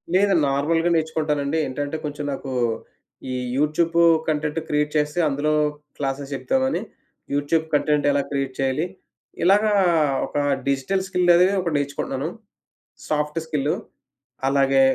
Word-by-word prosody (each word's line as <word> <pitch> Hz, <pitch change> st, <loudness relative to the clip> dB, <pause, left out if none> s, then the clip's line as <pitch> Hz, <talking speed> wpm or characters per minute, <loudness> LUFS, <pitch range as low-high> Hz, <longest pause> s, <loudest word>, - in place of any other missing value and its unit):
లేదు. 200 Hz, +1 st, +4 dB
నార్మల్‌గా 160 Hz, +5 st, +1 dB
నేర్చుకుంటానండి. 155 Hz, -2 st, 0 dB
ఏంటంటే 145 Hz, +3 st, -3 dB
కొంచెం 145 Hz, 0 st, -4 dB
నాకు 135 Hz, 0 st, -6 dB, 0.8 s
ఈ -, -, -2 dB, 0.2 s
యూట్యూబ్ 155 Hz, +3 st, +1 dB, 0.3 s
కంటెంట్ 150 Hz, 0 st, 0 dB
క్రియేట్ 150 Hz, 0 st, 0 dB
చేస్తే 150 Hz, +3 st, 0 dB
అందులో 150 Hz, +2 st, 0 dB, 0.4 s
క్లాసెస్ 135 Hz, 0 st, -3 dB
చెప్ద్దామని, 265 Hz, -, 0 dB, 0.5 s
యూట్యూబ్ 145 Hz, +3 st, +1 dB
కంటెంట్ 150 Hz, 0 st, +2 dB
ఎలా 140 Hz, -, +2 dB
క్రియేట్ 135 Hz, -2 st, -2 dB
చేయాలి? 135 Hz, +5 st, 0 dB, 0.6 s
ఇలాగా 205 Hz, +4 st, +4 dB, 0.5 s
ఒక -, -, -5 dB, 0.3 s
డిజిటల్ 140 Hz, +8 st, 0 dB
స్కిల్ 180 Hz, -2 st, +3 dB
అనేవి 180 Hz, +3 st, +4 dB
ఒక 170 Hz, -, -2 dB
నేర్చుకుంటున్నాను. 140 Hz, 0 st, -2 dB, 0.8 s
సాఫ్ట్ 150 Hz, +1 st, -1 dB
స్కిల్లు. 150 Hz, -2 st, 0 dB, 0.7 s
అలాగే 135 Hz, 0 st, +3 dB
150 Hz, 115 wpm, -23 LUFS, 140-165 Hz, 0.8 s, లేదు